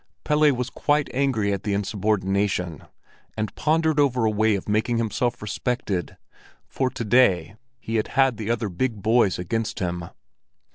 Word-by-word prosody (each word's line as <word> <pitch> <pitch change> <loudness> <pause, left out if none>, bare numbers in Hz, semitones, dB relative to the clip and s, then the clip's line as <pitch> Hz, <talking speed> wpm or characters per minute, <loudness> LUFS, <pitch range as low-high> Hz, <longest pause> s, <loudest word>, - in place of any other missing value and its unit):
Pelle 150 0 +4
was 125 -1 -3
quite 145 -1 0
angry 125 -7 +1
at 100 - -3
the 100 -1 -1
insubordination, 100 -4 -1 0.5
and 110 -2 -2
pondered 160 0 +1
over 130 -5 +2
a 110 - +2
way 110 0 +2
of 95 - -5
making 110 +3 +1
himself 115 +1 -1
respected; 105 -3 -3 0.5
for 130 -1 -1
to 115 - -5
day 100 -6 +3 0.2
he 115 -1 -2
had 110 - 0
had 135 -4 +4
the 110 0 -4
other 115 -3 0
big 105 +3 -2
boys 110 -3 +3
against 110 +6 -3
him. 85 -2 -3
110 Hz, 155 wpm, -24 LUFS, 100-125 Hz, 0.5 s, Pelle